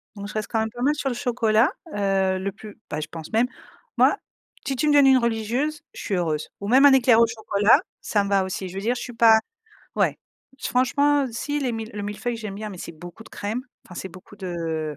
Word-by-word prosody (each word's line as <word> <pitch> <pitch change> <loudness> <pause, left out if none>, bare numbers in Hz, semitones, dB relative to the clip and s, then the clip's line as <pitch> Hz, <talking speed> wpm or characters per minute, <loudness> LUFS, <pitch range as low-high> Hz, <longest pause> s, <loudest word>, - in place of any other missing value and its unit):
donc 200 0 -7
je - - -9
reste 215 -1 -3
quand 225 - +1
même 220 0 0
pas 240 - -8
mal 295 +2 +3
sur 275 -2 -2
le 245 - -3
chocolat, 235 - +2 0.2
heu, 195 -2 +1
le 195 +1 -3
plus, 210 +1 -12
bah, 150 - -3
je 155 - -4
pense 160 -1 -9
même, 235 +3 +3 0.5
moi, - - +5 0.5
si 270 - -1
tu 300 +5 0
me 295 - +4
donnes 285 -2 +6
une 265 -1 +7
religieuse, 240 +6 -1
je - - -8
suis 200 - -1
heureuse 155 -4 -1
ou 200 - -5
même 265 +5 +6
un 280 - +8
éclair 245 -3 +5
au - - +7
chocolat, 215 -2 +3 0.2
ça 205 -2 +1
me - - -4
va 195 -1 +3
aussi. 190 0 -4
Je 180 - -10
veux 195 - -3
dire, 240 +4 0
je - - -5
suis 245 - -7
pas 225 -1 +6 0.6
ouais. - - +1 0.4
Franchement, 280 +3 +2
si 290 +5 -2
les 255 -3 -1
mille 225 0 -5
le 205 - -5
mille-feuille, 210 +4 -3
j'aime 215 -3 -6
bien, 215 +1 -5
mais 190 - -9
c'est - - -7
beaucoup 175 +6 -11
de - - -16
crème, 220 +5 -4 0.2
enfin, 180 - -13
c'est 190 - -6
beaucoup 185 +3 -14
de, 165 -5 -4
220 Hz, 245 wpm, -24 LUFS, 195-245 Hz, 0.6 s, un